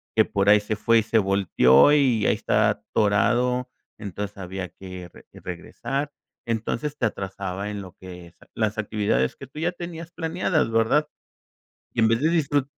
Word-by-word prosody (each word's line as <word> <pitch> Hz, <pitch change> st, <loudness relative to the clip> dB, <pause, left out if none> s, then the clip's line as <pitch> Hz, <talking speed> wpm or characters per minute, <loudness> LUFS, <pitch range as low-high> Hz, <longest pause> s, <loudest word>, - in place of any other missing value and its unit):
que -, -, +5 dB
por 100 Hz, 0 st, +1 dB
ahí 105 Hz, +1 st, +7 dB
se 105 Hz, +1 st, -3 dB
fue 115 Hz, +2 st, +3 dB
y -, -, 0 dB
se 115 Hz, +1 st, +1 dB
volteó, 95 Hz, -, +4 dB
y 130 Hz, -7 st, +3 dB
ahí -, -, +4 dB
está -, -, +2 dB
atorado". 120 Hz, +5 st, +1 dB, 0.3 s
Entonces 100 Hz, 0 st, -6 dB
había 95 Hz, -1 st, -6 dB
que 95 Hz, -2 st, -10 dB
re -, -, -17 dB, 0.2 s
regresar, 135 Hz, -, -4 dB, 0.3 s
entonces 115 Hz, +6 st, -3 dB
te 120 Hz, -, +3 dB
atrasaba 100 Hz, 0 st, -5 dB
en 105 Hz, -1 st, -5 dB
lo 95 Hz, -2 st, -11 dB
que 90 Hz, -2 st, -10 dB
es 85 Hz, -, -21 dB, 0.2 s
las 110 Hz, -1 st, -1 dB
actividades 100 Hz, -, 0 dB
que 140 Hz, -, -11 dB
tú 135 Hz, -, -16 dB
ya 170 Hz, +2 st, 0 dB
tenías 170 Hz, -1 st, -8 dB
planeadas, 165 Hz, -4 st, 0 dB
¿verdad? 115 Hz, +7 st, +2 dB, 0.9 s
Y -, -, -3 dB
en 110 Hz, -, +5 dB
vez 115 Hz, +1 st, +1 dB
de 155 Hz, -, +3 dB
disfru 145 Hz, -4 st, +1 dB
110 Hz, 175 wpm, -24 LUFS, 95-135 Hz, 0.9 s, ahí